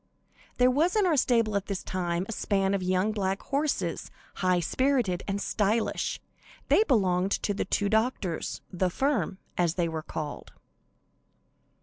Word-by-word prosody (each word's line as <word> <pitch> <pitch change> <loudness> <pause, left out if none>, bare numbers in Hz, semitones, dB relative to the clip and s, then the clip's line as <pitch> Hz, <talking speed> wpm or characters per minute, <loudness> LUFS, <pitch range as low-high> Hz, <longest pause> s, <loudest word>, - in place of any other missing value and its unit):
There 250 0 +5
was 320 +9 +2
in 420 -2 +3
our 340 -4 +3
stable 230 -5 +2
at 200 -1 -1
this 200 -2 -3
time, 175 -1 -2
a - - -5
span 195 -2 0
of 200 - 0
young 185 +3 +1
black 195 -2 -2
horses, 285 +1 -1 0.3
high 185 -1 +2
spirited 235 - +1
and 200 0 -1
stylish. 215 +2 0 0.5
They 430 - +6
belonged 190 - +2
to 205 - +1
the 200 - -2
two 205 - 0
doctors 220 -6 -1
"the 180 +1 +1
firm," 225 - 0 0.2
as 170 -1 +2
they 175 -2 +1
were 160 -1 -3
called. 155 -1 -6
200 Hz, 150 wpm, -28 LUFS, 180-245 Hz, 0.5 s, They